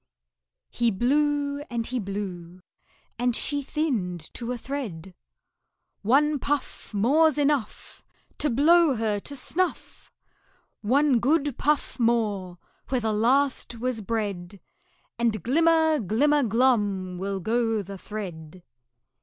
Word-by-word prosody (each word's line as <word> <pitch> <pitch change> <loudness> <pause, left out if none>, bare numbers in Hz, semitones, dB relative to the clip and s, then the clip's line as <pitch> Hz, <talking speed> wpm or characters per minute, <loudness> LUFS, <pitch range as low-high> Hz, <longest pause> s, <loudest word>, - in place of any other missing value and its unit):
He 235 -1 +1
blew 285 +6 +1
and 235 -2 -2
he 255 +1 -3
blew, 185 -3 -6 0.6
and 245 -1 +1
she 285 +2 +1
thinned 225 - -3
to 240 0 -5
a 250 - -3
thread. 215 - -6 0.9
"One 285 +7 +3
puff 285 -1 -3
More's 290 +10 +3
enough 285 -6 -1 0.4
To 300 - +1
blow 310 +3 +4
her 215 -2 -1
to 285 +7 -6
snuff! 350 +7 -3 0.7
One 265 +3 +3
good 285 +1 +1
puff 295 -2 0
more 210 -6 0 0.3
where 255 -2 0
the 220 -1 0
last 255 +4 +1
was 245 -1 -2
bred, 200 -3 -4 0.6
And 225 -5 0
glimmer, 320 +3 +3
glimmer, 280 +8 +2
glum 205 -7 +1
will 195 0 -3
go 225 +1 0
the 195 0 -9
thread!" 180 -5 -8
235 Hz, 115 wpm, -25 LUFS, 205-285 Hz, 0.9 s, blow